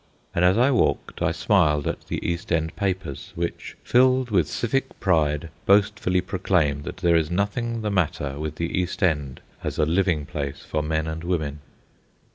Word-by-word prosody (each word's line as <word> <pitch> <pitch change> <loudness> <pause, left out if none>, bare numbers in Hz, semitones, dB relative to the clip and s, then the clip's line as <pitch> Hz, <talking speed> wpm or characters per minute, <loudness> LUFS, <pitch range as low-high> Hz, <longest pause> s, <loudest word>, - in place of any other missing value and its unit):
And 85 - +1
as 90 +3 +5
I 125 +4 +4
walked 125 - 0
I - - +2
smiled 75 -8 +2
at - - -4
the - - -3
East 85 0 -3
End 80 -1 0
papers, 95 -8 -3
which, 85 0 -4
filled 130 0 +3
with 90 -7 +3
civic 135 +3 -2
pride, 80 -4 +1 0.2
boastfully 100 -2 +3
proclaim 90 -7 0
that - - -7
there 85 -2 +3
is 80 -2 +2
nothing 110 +5 -1
the 105 - -1
matter 80 -6 -1
with 75 0 -4
the 85 +3 -1
East 90 +1 -3
End 75 -7 0 0.2
as - - -3
a 75 - +3
living 85 -2 +1
place 70 -1 -5
for 75 - -2
men 80 +1 -1
and 80 +1 -5
women. 80 -5 -2
85 Hz, 175 wpm, -24 LUFS, 75-100 Hz, 0.2 s, as